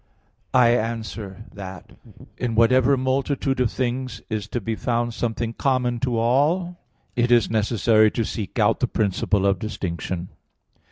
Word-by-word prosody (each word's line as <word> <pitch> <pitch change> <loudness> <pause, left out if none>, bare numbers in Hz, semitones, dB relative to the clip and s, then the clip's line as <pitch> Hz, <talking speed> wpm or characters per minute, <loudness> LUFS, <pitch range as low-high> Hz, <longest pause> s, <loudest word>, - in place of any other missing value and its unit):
I 120 -2 +6
answer 110 -3 -2
that, 95 -2 -9 0.4
In 120 -2 -2
whatever 130 +4 +4
multitude 135 +1 0
of 125 -3 +2
things 125 -2 -3
is 105 -1 -2
to 120 - -3
be 115 +1 -3
found 120 +1 -1
something 115 0 -2
common 125 -2 0
to 125 -1 -1
all, 155 +10 +1 0.4
it 120 0 +1
is 120 -4 +4
necessary 110 0 +3
to 115 +1 -2
seek 105 -3 -5
out - - +3
the - - +1
principle 100 -1 0
of 100 -2 +2
distinction. 90 -3 -4
115 Hz, 145 wpm, -23 LUFS, 110-125 Hz, 0.4 s, I